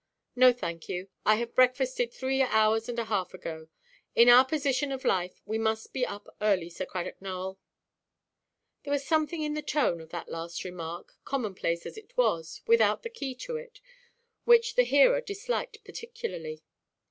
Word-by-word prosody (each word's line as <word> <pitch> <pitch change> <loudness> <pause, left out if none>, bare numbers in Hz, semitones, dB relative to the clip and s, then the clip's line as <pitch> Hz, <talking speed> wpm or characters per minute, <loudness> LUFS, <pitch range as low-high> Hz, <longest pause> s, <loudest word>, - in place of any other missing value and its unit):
"No, 255 0 +7
thank 170 -9 -6
you. 185 +2 -4 0.2
I 215 - +7
have 235 +1 -3
breakfasted 255 -1 +2
three 265 +2 -1
hours 220 -2 +3
and 240 - -4
a 235 - -1
half 200 -4 -2
ago. 160 -3 -7 0.5
In 235 +1 +7
our 245 +1 +9
position 280 0 0
of 265 -1 -5
life, 180 -1 0
we 220 +2 -2
must 220 0 -1
be 255 -2 0
up 205 - -8
early, 190 -5 +1
Sir 185 +2 -5
Cradock 180 0 -5
Nowell." 190 0 -5 1.2
There 285 - -5
was 280 -1 -1
something 315 +1 +1
in 300 0 -1
the 300 - -2
tone 285 - 0
of 160 - -13
that 170 0 -6
last 165 0 -5
remark, 175 -2 -7
common–place 190 -10 -2
as 435 - -7
it - - -21
was, 165 - 0
without 465 +2 +4
the 465 - -6
key 275 - -5
to 480 -1 -3
it, 480 0 -11 0.6
which 465 -1 +5
the 250 - +4
hearer 285 - +5
disliked 435 +1 -4
particularly. 450 - -7
245 Hz, 170 wpm, -29 LUFS, 185-300 Hz, 1.2 s, our